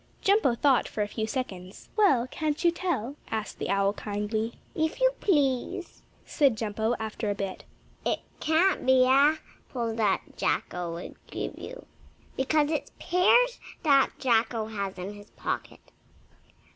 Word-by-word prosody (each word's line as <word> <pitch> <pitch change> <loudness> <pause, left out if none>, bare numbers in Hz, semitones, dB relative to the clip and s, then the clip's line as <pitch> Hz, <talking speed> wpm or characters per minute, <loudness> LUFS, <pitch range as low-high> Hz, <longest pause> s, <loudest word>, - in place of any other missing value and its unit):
Jumpo 390 - +4
thought 265 0 +3
for 210 - -2
a - - -3
few 220 +1 -3
seconds. 190 -7 -5
"Well, 285 - +4
can't 300 +4 -2
you 340 - +6
tell?" 320 - -2
asked 220 -1 -4
the - - -3
owl 200 0 +2
kindly. 215 +2 -3 0.2
"If 315 +5 -1
you - - +5
please," 300 +2 0 0.2
said 275 -7 +2
Jumpo, 220 +2 -1
after 220 0 -3
a 205 - 0
bit, 195 -1 -5 0.4
"it - - 0 0.2
can't 330 +5 +2
be 260 -1 +5
apples 265 -4 +1
that 210 -4 +2 0.2
Jacko 175 -1 -1
would 170 +2 -8
give - - -5
you, - - -9 0.5
because 295 +3 +2
it's 310 - -2
pears 480 +8 +4 0.2
that 280 -4 +5
Jacko 230 -2 +1
has 200 -3 -4
in 185 +3 -5
his 205 0 -13
pocket. - - -5
245 Hz, 145 wpm, -28 LUFS, 210-310 Hz, 0.5 s, you